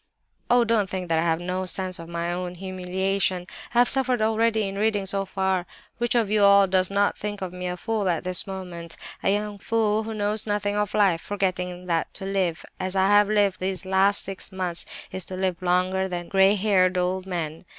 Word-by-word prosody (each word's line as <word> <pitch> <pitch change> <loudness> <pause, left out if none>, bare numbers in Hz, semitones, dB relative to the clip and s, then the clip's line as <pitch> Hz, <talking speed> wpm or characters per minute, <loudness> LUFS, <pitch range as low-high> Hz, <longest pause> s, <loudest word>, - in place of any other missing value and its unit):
"Oh, 245 0 +5
don't 220 -4 +1
think 185 -2 -4
that 165 -1 +2
I - - +2
have 165 -1 +1
no 185 +1 -3
sense 185 0 -1
of 165 0 -9
my 170 0 -2
own 180 0 -4
humiliation! 185 0 -1 0.3
I - - +2
have 245 0 +6
suffered 255 -3 +2
already 220 -1 +2
in 195 - -5
reading 210 -2 +1
so 195 +1 0
far. 190 -2 -1 0.3
Which 240 0 +1
of 225 -4 +2
you 210 -1 +3
all 200 0 +7
does 185 -1 +2
not 200 +1 +2
think 205 0 -4
me 180 0 -5
a 180 0 -3
fool 210 0 -1
at 170 -2 0
this 185 +2 +2
moment—a 180 -2 -6
young 205 0 -1
fool 220 0 +1
who 220 0 -5
knows 210 +1 -1
nothing 205 0 -1
of 210 -1 -1
life—forgetting 180 -1 0
that 165 -2 -1
to 190 - -5
live 190 -4 -1
as 185 +1 -3
I 190 0 +3
have 205 0 +5
lived 205 -3 +2
these 190 +1 -2
last 190 +2 +3
six 195 0 -6
months 180 -2 -3 0.2
is 185 - -2
to 185 - -6
live 185 -2 -2
longer 185 +1 +1
than 175 -2 -5
grey 195 +1 +5
haired 185 -3 +2
old 185 +1 -1
men. 165 -2 -4
190 Hz, 200 wpm, -25 LUFS, 180-205 Hz, 0.3 s, all